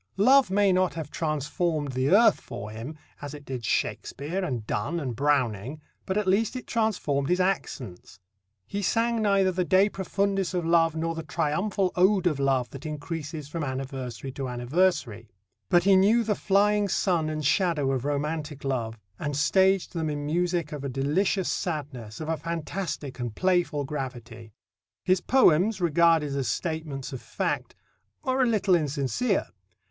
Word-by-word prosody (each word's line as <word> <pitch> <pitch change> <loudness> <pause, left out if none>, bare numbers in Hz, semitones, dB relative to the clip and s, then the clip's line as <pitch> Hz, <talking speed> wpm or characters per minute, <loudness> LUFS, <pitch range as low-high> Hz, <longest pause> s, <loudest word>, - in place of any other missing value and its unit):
Love 260 +2 +5
may 195 0 +3
not 185 -4 +1
have 160 -3 -6
transformed 155 0 -1
the 130 +2 0
earth 215 +7 +5
for 105 +1 -7
him, 120 +8 -7 0.2
as 145 0 -6
it 145 -1 -12
did 130 -3 -5
Shakespeare 155 - -2
and 125 -11 -3
Donne 110 +12 -2
and 130 -6 -4
Browning, 130 -1 0 0.3
but 190 - -1
at 210 - +1
least 200 +6 +1
it 255 - -5
transformed 180 -12 0
his 180 +1 +2
accents. 130 - -3 0.5
He 200 - -4
sang 230 +3 +1
neither 195 -3 +3
the 180 0 0
"De 190 +3 +4
Profundis" 195 0 -1
of 175 -2 -1
love 165 -1 +3
nor 165 +1 -1
the 165 - -5
triumphal 185 +6 -1
ode 190 +1 +3
of 155 -5 +1
love 130 -3 +1
that 135 - -9
increases 150 0 -5
from 160 +2 -4
anniversary 130 -2 -5
to 135 -1 -5
anniversary; 120 - 0 0.4
but 175 - +4
he 195 +1 +5
knew 210 +5 +4
the 215 -1 +1
flying 205 +1 +2
sun 175 -4 +1
and 155 -1 -3
shadow 150 -4 +2
of 130 -2 -1
romantic 145 0 -3
love, 120 -4 -2 0.2
and 145 -1 -3
staged 190 +5 +3
them 160 -2 -2
in 145 -1 -3
music 170 0 0
of 150 -2 -6
a 140 - -2
delicious 160 +9 0
sadness, 140 - -4
of 155 - -5
a 160 0 -1
fantastic 165 -4 -4
and 120 -3 -4
playful 175 -6 +1
gravity. 120 -5 -6 0.5
His 185 -1 +2
poems, 210 -5 +4
regarded 165 -3 +3
as 135 -3 -1
statements 150 - -3
of 130 - -6
fact, - - -3 0.5
are 260 -2 +1
a 255 - +4
little 205 -4 +2
insincere. 155 - 0
160 Hz, 165 wpm, -26 LUFS, 135-190 Hz, 0.5 s, Love